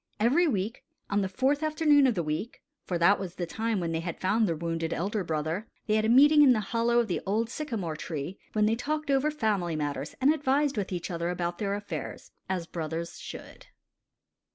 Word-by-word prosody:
Every 270 +11 +4
week, 215 -3 -2 0.3
on 205 0 +2
the 190 - -1
fourth 265 +9 +1
afternoon 305 -3 +4
of 245 - +1
the 175 - 0
week 155 +9 -4 0.2
(for 180 - -1
that 175 +4 +4
was 185 -3 -6
the 175 - -3
time 220 +4 -2
when 170 -2 -2
they 160 - -1
had 170 0 -5
found 210 +4 +2
their 165 - 0
wounded 165 0 -2
elder 200 +3 -1
brother), 160 +5 -2 0.2
they 215 - 0
had 215 0 +2
a - - +1
meeting 290 +5 +7
in 270 -3 +7
the 220 - +1
hollow 235 +1 +2
of 240 -1 +3
the 180 - -2
old 220 +4 -1
sycamore 225 - -3
tree, 160 +3 -5
when 215 -1 +3
they 220 +1 +2
talked 300 +4 -2
over 275 +2 +3
family 210 - 0
matters 145 -1 -3
and 275 +3 +5
advised 285 -1 +1
with 200 -2 -2
each 180 0 -4
other 170 0 -2
about 175 -1 -3
their 200 -1 -1
affairs, 205 0 -6 0.2
as 185 -3 -1
brothers 165 0 -5
should. - - -10
205 Hz, 210 wpm, -28 LUFS, 170-250 Hz, 0.3 s, meeting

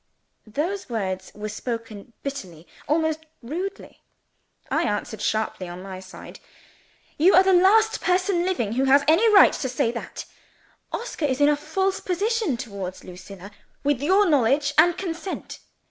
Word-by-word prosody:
Those 335 - -3
words 190 -5 -3
were 210 +1 -5
spoken 230 -1 -6
bitterly 185 - -7 0.2
almost 315 0 0 0.2
rudely. 360 +11 -6 0.7
I 315 - +2
answered 220 - -3
sharply 215 -4 -1
on 175 +1 -8
my 190 -1 -7
side. 185 - -12 0.8
"You 355 +6 +6
are 375 - +7
the 380 0 +3
last 430 +5 +4
person 365 -1 +1
living 355 - -1
who 260 +3 +1
has 280 +1 +5
any 395 +9 +5
right 400 - +7
to 260 - -3
say 235 -2 0
that. 235 - -7 0.7
Oscar 460 -9 -3
is 265 -2 -1
in 290 0 +5
a 295 - +3
false 380 +6 -1
position 400 - -1
towards 200 -6 -7
Lucilla, 185 +2 -11 0.3
with 285 -3 +1
your 380 +7 +4
knowledge 285 0 +2
and 340 +2 +5
consent. 365 0 -5
290 Hz, 145 wpm, -24 LUFS, 220-365 Hz, 0.8 s, are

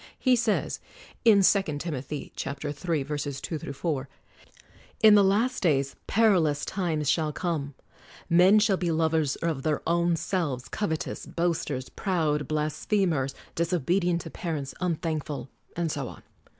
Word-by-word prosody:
He 255 -2 +3
says 230 -3 0 0.5
(II. 205 -3 +7
Tim. 170 -5 +2 0.2
iii: 150 -2 -6
2 140 +2 -4 1.0
4): 140 -3 -2 0.9
"In 215 -1 +9
the 205 -1 +7
Last 220 +7 +2
Days 140 -6 +1
peril 200 -7 +4
ous 145 -1 -2
times 165 -6 -1
shall 155 +1 +2
come; 150 -4 -3 0.5
men 180 +4 +6
shall 210 -2 +3
be 175 -2 -1
lovers 160 -3 +1
of 160 -5 -2
their 150 +1 -1
own 170 0 +2
selves, 155 -8 -2
covetous, 160 -7 -3
boasters, 165 -6 -2
proud, 155 -7 -1
blasphe 155 +7 0
mers, 135 -5 -1 0.2
disobedient 175 +1 +1
to - - -9
parents, 150 -6 -4
unthankful, 155 -5 -2
' - - -43
' - - -31
and 170 -2 0
so 140 -4 -3
on. - - -11
165 Hz, 135 wpm, -27 LUFS, 150-185 Hz, 1.0 s, In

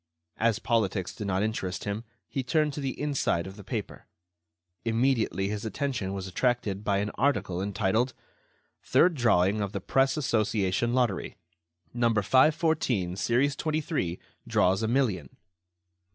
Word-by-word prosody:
As 115 -1 +2
politics 105 -5 0
did 105 -4 -5
not 95 0 +1
interest 105 -4 -2
him, 105 +2 -3 0.2
he 135 - -2
turned 150 +3 +1
to 145 - -5
the 135 -2 -3
inside 140 - 0
of 95 0 -8
the 105 - -11
paper. 110 0 -5 0.8
Immediately 115 -5 +1
his 105 0 -3
attention 115 -4 -2
was 95 -1 -4
attracted 105 0 -1
by 100 -2 +1
an 105 +1 -1
article 95 -10 +1
entitled: 100 +5 0 0.7
"Third 175 +1 +4
Drawing 105 - +2
of 100 -1 -3
the 100 - -2
Press 135 +3 +3
Association 110 -3 +1
Lottery. 120 -7 0 0.6
"No. 120 -1 +2
514, 130 - +2
series 130 +8 +1
23, 155 - -1 0.3
draws 95 +3 +2
a 110 - 0
million." 110 - 0
110 Hz, 140 wpm, -28 LUFS, 95-130 Hz, 0.8 s, Third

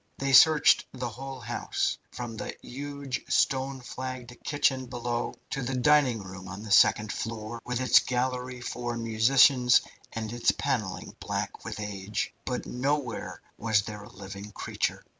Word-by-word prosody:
They 135 0 -1
searched 155 +3 +7
the 125 -2 -3
whole 135 +3 -7
house, 105 - -2
from 120 -1 -6
the 110 - -5
huge 140 0 -5
stone 135 0 +1
flagged 130 -1 -6
kitchen 135 -3 +1
below 120 -1 -3 0.2
to 135 - -2
the 130 +1 -2
dining 130 -4 +4
hall 95 0 -9
on 100 +2 -7
the 110 - -7
second 105 +2 +5
floor, 115 0 -5
with 125 -1 -1
its 130 -1 +6
gallery 125 0 -2
for 120 0 -3
musicians, 125 +3 +5 0.3
and 110 0 -4
its 120 - +3
panelling 110 -9 -2
black - - -4
with - - -6
age, 105 0 -3
but 125 -1 -3
nowhere 130 -2 -2 0.2
was 110 -2 +2
there 105 0 -7
a 105 - -12
living 100 +2 -9
creature. - - -2
120 Hz, 150 wpm, -28 LUFS, 110-130 Hz, 0.3 s, searched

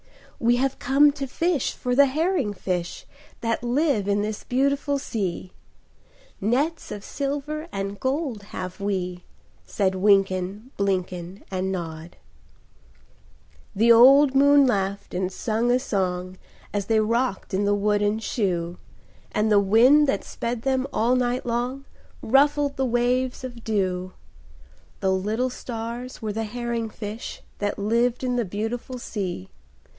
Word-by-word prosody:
"We 240 0 +3
have 270 +2 0
come 280 +3 +5
to 275 -1 -5
fish 330 +1 0
for 250 - -2
the 280 +1 +6
herring 300 - 0
fish 180 -2 -3 0.4
That 230 -1 -1
live 245 -4 +1
in 205 0 +1
this 215 0 -4
beautiful 280 +2 +1
sea; 190 -8 -3 0.9
Nets 275 - 0
of 205 - -6
silver 290 +4 -3
and 195 +1 -4
gold 265 -4 -2
have 185 -2 -7
we," 180 -3 -2 0.4
Said 190 -2 0
Wynken, 195 +3 +1
Blynken, 185 -1 -2
And 190 0 -1
Nod. 165 -2 -6 1.6
The 230 +4 +5
old 265 +4 +7
moon 285 +1 +6
laughed 200 -4 -1
and 185 +1 -1
sang 225 +4 -1
a 245 - +4
song, 185 -6 -2 0.4
As 200 -1 -2
they 225 -1 +3
rocked 230 -1 -1
in 200 +2 +1
the 205 0 +3
wooden 205 +1 +1
shoe; 180 -6 -2 0.5
And 215 +1 +1
the 205 - +6
wind 240 +9 +5
that 275 - 0
sped 235 0 -4
them 265 0 +1
all 235 +3 +2
night 250 0 0
long 245 +3 -2 0.4
Ruffled 285 +3 +3
the 265 - 0
waves 250 +1 0
of 240 -3 -8
dew; 185 -4 -1 0.9
The 190 - +2
little 215 +7 0
stars 235 +1 -6
were 215 -1 -2
the 225 +1 -2
herring 235 0 -3
fish 215 +1 -7 0.2
That 205 0 -1
lived 235 +4 +1
in 250 -1 0
the 240 - +1
beautiful 225 +6 -4
sea. 185 - -5
225 Hz, 140 wpm, -24 LUFS, 195-260 Hz, 1.6 s, old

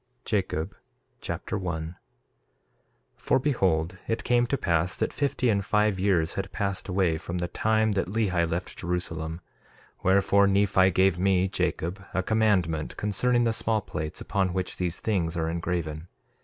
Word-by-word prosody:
Jacob 95 -4 -1 0.4
Chapter 105 - -4
1 80 -4 -3
1:1 85 - -12 1.2
For - - +2
behold, 95 - 0
it 115 - -1
came 120 0 +2
to 140 - 0
pass 85 -3 +1
that - - -1
fifty 140 -3 0
and 100 -3 +2
five 105 -1 +1
years 90 -4 +2
had 95 - -4
passed 100 -3 -2
away 90 -4 +1
from 85 +2 -5
the 85 0 -1
time 110 +3 +1
that 100 -3 0
Lehi 95 -5 0
left 85 +2 -3
Jerusalem; 85 -2 -3 0.6
wherefore, 100 +1 +4
Nephi 95 -1 +4
gave 95 -1 +2
me, 95 0 +3
Jacob, 95 +1 -2
a 95 - +1
commandment 95 -8 +1
concerning 120 +4 +1
the 115 -1 +2
small 110 0 +1
plates, 80 -3 -5
upon 95 -3 -1
which 95 0 -3
these 90 -2 -2
things 90 -6 -1
are 80 -1 0
engraven. 85 -1 -3
95 Hz, 155 wpm, -27 LUFS, 85-105 Hz, 1.2 s, wherefore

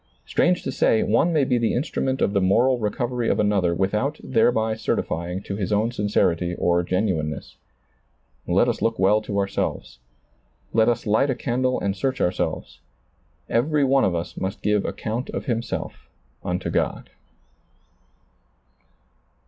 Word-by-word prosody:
Strange 180 0 +1
to - - -3
say, 110 - +2
one 115 +11 +2
may 155 -4 +3
be 125 -2 +1
the 115 - +1
instrument 130 0 -1
of 100 - +1
the 100 - +2
moral 120 +7 +3
recovery 120 +2 -1
of - - +1
another 100 -4 +2
without 105 - -1
thereby 110 -2 +2
certifying 90 -4 -2
to 100 - -5
his 100 -2 -3
own 105 +3 +1
sincerity 90 -6 0
or 85 0 +2
genuineness. 90 -5 -2 0.9
Let - - +3
us - - -1
look 115 0 +1
well 100 +3 +3
to 105 -1 -4
ourselves. 100 -10 -2 0.7
Let 110 0 +4
us 120 0 -1
light 110 +6 +2
a 130 - +1
candle 130 +1 0
and 100 -1 -1
search 130 +5 -2
ourselves. 90 - -2 0.7
Every 145 +5 +1
one 135 0 +3
of 90 - +1
us 85 +1 -4
must 95 +2 -4
give 105 -1 +1
account 115 +4 -4
of - - -4
himself 115 -4 -4 0.3
unto - - -2
God. - - -2
110 Hz, 150 wpm, -23 LUFS, 95-125 Hz, 0.9 s, Let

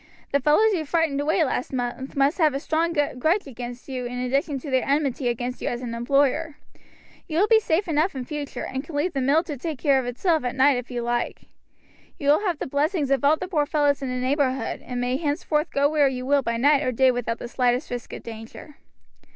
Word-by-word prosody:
The 280 - +3
fellows 305 +11 +4
you 335 -4 -1
frightened 310 -2 0
away 315 +4 +2
last 260 -3 -2
month 260 +1 -4
must 280 +6 +2
have 305 -4 +3
a - - -1
strong 325 +3 0 0.3
grudge 340 +9 +2
against 245 -2 -8
you 255 -2 -4
in 245 +1 -6
addition 275 +4 0
to 285 - -7
their 260 -1 +2
enmity 275 -2 0
against 245 +1 -3
you - - -3
as 240 +1 -3
an 235 -2 -4
employer. 280 +5 +1 0.7
You 315 -3 -3
will 400 +5 +4
be 450 0 +6
safe 360 -2 0
enough 315 +2 +1
in 255 -2 -4
future, 295 0 -5
and 265 +1 -4
can 300 0 -9
leave 320 +5 0
the 270 - -1
mill 285 +5 +3
to 320 -4 -5
take 310 +2 -4
care 275 -1 +3
of 250 - -4
itself 315 +6 0
at 245 0 -2
night 265 0 +4
if 245 0 -6
you 240 -2 -3
like. 240 0 -2 0.7
You 285 - -1
will 295 - +5
have 345 -4 0
the - - -4
blessings 290 +1 0
of 275 -2 +2
all 295 +3 +4
the 365 - -5
poor 300 -5 0
fellows 290 -2 +1
in 270 - -3
the 255 - -2
neighborhood, 260 -1 -1
and 250 -1 -5
may 250 +1 0
henceforth 300 +1 -1
go 280 +1 +2
where 295 -1 +3
you 255 -1 -3
will 280 +1 +3
by 235 -2 -2
night 285 +3 +4
or 255 - 0
day 260 +2 +4
without 240 -2 -2
the - - -7
slightest 245 +2 0
risk 245 -1 -5
of - - -8
danger." 225 +6 -10
280 Hz, 235 wpm, -24 LUFS, 250-305 Hz, 0.7 s, be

